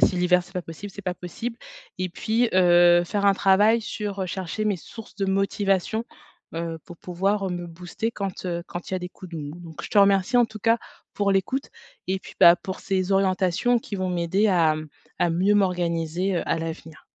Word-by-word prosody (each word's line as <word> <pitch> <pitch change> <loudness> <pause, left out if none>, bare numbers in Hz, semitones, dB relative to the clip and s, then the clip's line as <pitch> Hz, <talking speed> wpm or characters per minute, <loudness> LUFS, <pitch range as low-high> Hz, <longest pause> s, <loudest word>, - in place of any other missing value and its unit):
si 185 - +4
l'hiver, 180 0 +3
c'est 175 +2 -19
pas 180 - -2
possible, 170 +6 -9
c'est 200 - -10
pas 180 -1 -1
possible. 225 +7 -6 0.4
Et 185 0 -1
puis, 225 +6 0
heu, 175 -1 +6
faire 200 +3 -1
un 200 - +5
travail 205 +4 +4
sur, 205 -2 -4
heu, - - -2
chercher 185 +3 -4
mes 210 -2 +1
sources 225 +5 -12
de 195 - -1
motivation, 195 +2 0 0.5
heu, 165 0 -3
pour 175 - -11
pouvoir 195 +3 -1
me 175 -1 -4
booster 175 +6 -4
quand, 195 -3 -5
heu, 170 -1 -2
quand 175 - -7
il 190 - -1
y - - +1
a - - -2
des 180 0 -7
coups 180 -2 -13
de - - -4
mou. 145 -1 -6
Donc, 165 -2 -9
je - - -8
te 210 - +3
remercie 200 +4 +4
en 240 - +5
tout 215 0 -10
cas 230 +3 +3 0.3
pour 200 -1 +1
l'écoute 225 +9 -1 0.4
et 190 +1 0
puis, - - -13
bah, 170 +1 +9
pour 190 0 -7
ces 190 0 -1
orientations 195 +4 +2
qui 220 - -8
vont 185 -1 -2
m'aider 180 +4 +1
à, 165 -5 +3
mmh, 155 0 -6 0.3
à 175 - +2
mieux 185 +5 +2
m'organiser, 180 -1 0
heu, - - 0
à 165 - 0
l'avenir. 160 -1 -7
185 Hz, 215 wpm, -24 LUFS, 175-200 Hz, 0.5 s, bah